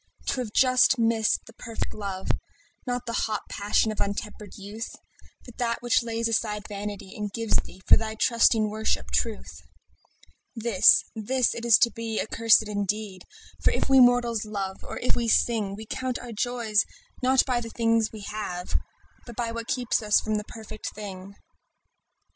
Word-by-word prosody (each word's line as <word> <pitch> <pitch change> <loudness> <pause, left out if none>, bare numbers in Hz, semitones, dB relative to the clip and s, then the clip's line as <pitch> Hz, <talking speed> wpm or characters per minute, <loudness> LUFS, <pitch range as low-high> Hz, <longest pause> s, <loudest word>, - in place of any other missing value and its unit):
To 255 - 0
have 225 -4 -5
just 255 +2 +4
missed 225 -1 +2
the - - -14
perfect 230 -2 -5
love, 195 -3 -5 0.6
Not 245 0 -2
the 230 - -4
hot 215 -3 -1
passion 210 +2 +1
of 215 - -4
untempered 205 0 -4
youth, 210 +3 -7 0.5
But 245 -1 -14
that 235 -1 -1
which 240 +1 +3
lays 230 0 -1
aside 215 -2 -1
its - - -12
vanity 205 -1 -6
And 210 -2 -4
gives 225 +1 0
thee, 185 +1 -6
for - - +8
thy 220 -1 -3
trusting 225 -2 +3
worship, 220 +1 -1
truth— 225 -3 -2 0.9
This, 225 -4 +5
this 245 +3 +1
it 235 - -6
is 235 -2 +7
to 235 - +3
be 225 -1 -4
accursed 225 -1 +3
indeed; 205 -2 -3 0.4
For - - +5
if - - -1
we 270 0 +7
mortals 245 -3 +4
love, 200 -3 -5
or - - -7
if 250 - 0
we 235 -1 -1
sing, 215 -3 +2
We 220 +2 -9
count 255 +2 -3
our 245 - -9
joys 225 -2 +1 0.4
not 260 +1 +4
by 250 -2 0
the 230 - -6
things 230 -1 +1
we 220 - -9
have, 195 -4 -3 0.5
But 235 - -9
by 235 -1 -2
what 230 0 -6
kept 245 -2 0
us 210 -1 +4
from 215 - -3
the 210 - -3
perfect 220 -1 -8
thing. 200 -2 -8
220 Hz, 175 wpm, -26 LUFS, 210-235 Hz, 0.9 s, for